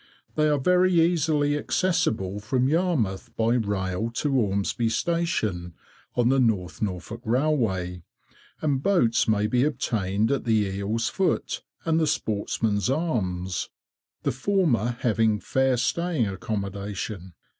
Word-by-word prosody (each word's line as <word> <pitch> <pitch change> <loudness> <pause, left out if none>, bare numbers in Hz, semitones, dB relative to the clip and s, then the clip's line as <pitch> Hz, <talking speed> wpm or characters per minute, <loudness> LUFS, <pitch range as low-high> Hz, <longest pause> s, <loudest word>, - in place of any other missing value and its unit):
They 155 0 +2
are 150 - +3
very 180 +4 +3
easily 155 -3 +2
accessible 150 - 0
from 125 +5 0
Yarmouth 150 - 0
by 115 +1 +2
rail 100 -2 -1
to 150 - 0
Ormesby 110 -1 +1
station, 110 - -1 0.4
on 120 -1 +3
the 135 +1 +3
North 105 -8 0
Norfolk 105 +3 -4
Railway, 110 - 0 0.6
and 140 -4 +1
boats 125 - +2
may 105 -1 +2
be 120 +4 +2
obtained 110 -7 0
at 140 - 0
the 115 -2 +2
Eel's 100 +4 -2
Foot, 190 -1 -1 0.2
and 165 -1 +2
the 160 - +2
Sportsman's 105 -3 0
Arms, 95 - -1 0.5
the - - +1
former 130 - +1
having 110 -2 +2
fair 130 +2 +1
staying 165 +1 0
accommodation. 100 -1 -5
115 Hz, 125 wpm, -25 LUFS, 100-150 Hz, 0.6 s, are